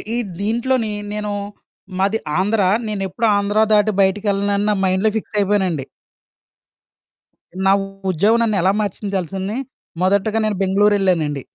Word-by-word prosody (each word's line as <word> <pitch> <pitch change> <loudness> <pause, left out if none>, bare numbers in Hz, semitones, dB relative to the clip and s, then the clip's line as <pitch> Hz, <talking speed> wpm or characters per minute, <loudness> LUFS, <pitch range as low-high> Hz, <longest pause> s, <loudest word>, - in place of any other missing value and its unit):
ఈ - - 0 0.2
దీంట్లోని 230 +2 0 0.2
నేను 210 0 -3 0.7
మాది 200 +3 +2 0.2
ఆంధ్ర, 205 +3 +1 0.3
నేనెప్పుడూ 205 +1 -1
ఆంధ్రా 205 +2 +2
దాటి 210 0 +4
బయటికెళ్ళనని 200 +1 +1
నా - - +3
మైండ్‌లో 190 +3 +2
ఫిక్స్ 215 - -5
అయిపోయానండి. 190 -8 0 1.8
నా 195 - +5 0.4
ఉద్యోగం 210 +7 +2
నన్ను 215 -3 +1
ఎలా 185 +3 +3
మార్చించాల్సింది. 195 0 -3 0.4
మొదటగా 200 +4 +2
నేను 210 -2 -1
బెంగుళూరెళ్ళానండి. 190 -7 +2
200 Hz, 110 wpm, -19 LUFS, 190-215 Hz, 1.8 s, నా